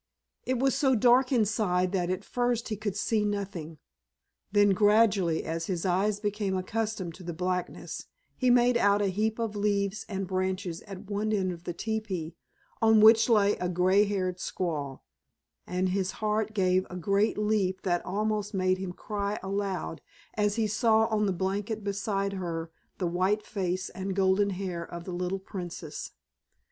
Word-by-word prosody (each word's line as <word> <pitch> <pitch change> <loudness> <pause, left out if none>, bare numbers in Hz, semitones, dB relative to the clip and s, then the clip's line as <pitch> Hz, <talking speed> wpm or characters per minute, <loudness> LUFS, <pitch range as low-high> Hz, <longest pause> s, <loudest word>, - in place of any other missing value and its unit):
It 255 0 +1
was 270 +2 +2
so 270 -2 +3
dark 250 +3 +4
inside 205 -6 +2
that 180 -3 0
at 185 +2 -2
first 245 -1 -1
he 215 - -1
could 205 -2 -3
see 215 +1 +1
nothing; 195 -6 -3 0.7
then 205 0 +5
gradually 205 -4 +3
as 165 +1 -3
his 180 -2 -2
eyes 195 +3 +1
became 205 -2 -1
accustomed 200 -2 -3
to 185 - -12
the 170 -1 -5
blackness 180 +1 -3 0.3
he 255 - +1
made 245 0 +5
out 205 -2 +3
a 200 - +2
heap 220 +2 0
of 225 -3 -2
leaves 200 0 0
and 195 -1 -2
branches 185 -2 -2
at 195 0 -9
one 210 +1 -1
side 190 -3 +1
of 175 0 -9
the 175 - -3
teepee, 190 -6 -3 0.5
on 220 -1 +6
which 225 +2 +7
lay 205 -3 +4
a 180 - -2
grey 185 +3 +4
haired 185 -3 -2
squaw, 150 -8 -3 0.7
and 185 +1 0
his 190 0 -1
heart 215 0 -1
gave 185 -2 +3
a 180 - -7
great 200 +5 +1
leap 210 -3 0
that 175 -2 0
almost 210 +1 -1
made 185 0 +1
him 185 -2 -4
cry 205 +1 -3
aloud 195 -4 -3 0.3
as 210 -1 +1
he 225 -1 +1
saw 220 +1 +3
on 210 -2 +1
the - - +1
blanket 200 +4 -2
beside 200 0 -1
her 165 -3 -4 0.3
the 185 - -1
white 185 +5 +1
face 185 -2 -2
and 190 0 -4
golden 195 +1 +3
hair 185 -3 -3
of 170 0 -8
the 180 - -6
little 180 +2 -2
Princess. 190 - -7
200 Hz, 170 wpm, -28 LUFS, 185-215 Hz, 0.7 s, which